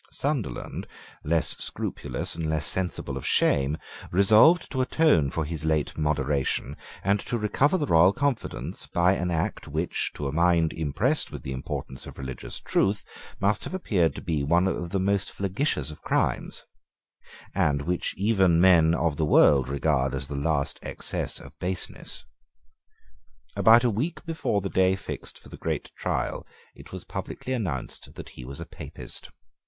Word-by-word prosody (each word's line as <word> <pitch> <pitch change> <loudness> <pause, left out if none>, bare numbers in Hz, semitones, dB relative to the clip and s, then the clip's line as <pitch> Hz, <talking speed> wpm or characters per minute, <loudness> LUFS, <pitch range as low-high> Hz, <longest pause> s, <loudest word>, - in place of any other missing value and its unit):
Sunderland, 140 -6 -3 0.4
less 80 +2 +2
scrupulous - - 0
and 80 -1 -3
less 80 -1 0
sensible 95 -1 0
of - - -6
shame, 70 +2 +2 0.3
resolved 110 - +5
to 130 - 0
atone 130 - +3
for 80 +2 -2
his 80 -1 -5
late 80 -2 0
moderation, 75 -2 0 0.3
and 100 +2 +2
to 120 - -3
recover 130 - +2
the 150 - 0
royal 85 - +6
confidence, 105 - -2
by 85 +2 +3
an 90 -2 -1
act 85 +3 -2
which, 80 +3 -2
to 75 - -3
a - - -2
mind 85 0 +3
impressed 95 - -1
with - - -8
the 65 - -5
importance 65 0 -5
of - - -10
religious 65 -3 -6
truth, 100 +1 0 0.3
must 100 +2 +1
have - - -5
appeared 95 - +1
to - - -7
be 80 -6 -1
one 85 +6 +3
of 90 -2 -2
the 95 +2 0
most 100 +1 +1
flagitious 95 - -1
of 75 - -12
crimes, - - -1 0.9
and 70 -1 +1
which 90 +2 -2
even 95 -4 +3
men 85 -3 +6
of 80 -3 0
the 80 - 0
world 70 -3 +5
regard 70 -1 +1
as 70 +1 -4
the 75 - -5
last 70 0 -1
excess - - -3
of 70 0 -12
baseness. 90 0 -4 1.3
About 115 +2 +6
a 120 - +3
week 155 - -3
before 160 -11 -1
the 100 - -2
day 95 0 +3
fixed 95 - -7
for - - -15
the - - -10
great - - -3
trial, - - -2 0.3
it - - -14
was - - -7
publicly 130 - -5
announced 90 - -4
that - - -9
he 65 - -10
was 70 +2 -8
a - - -6
Papist. - - -8
85 Hz, 165 wpm, -26 LUFS, 75-100 Hz, 1.3 s, royal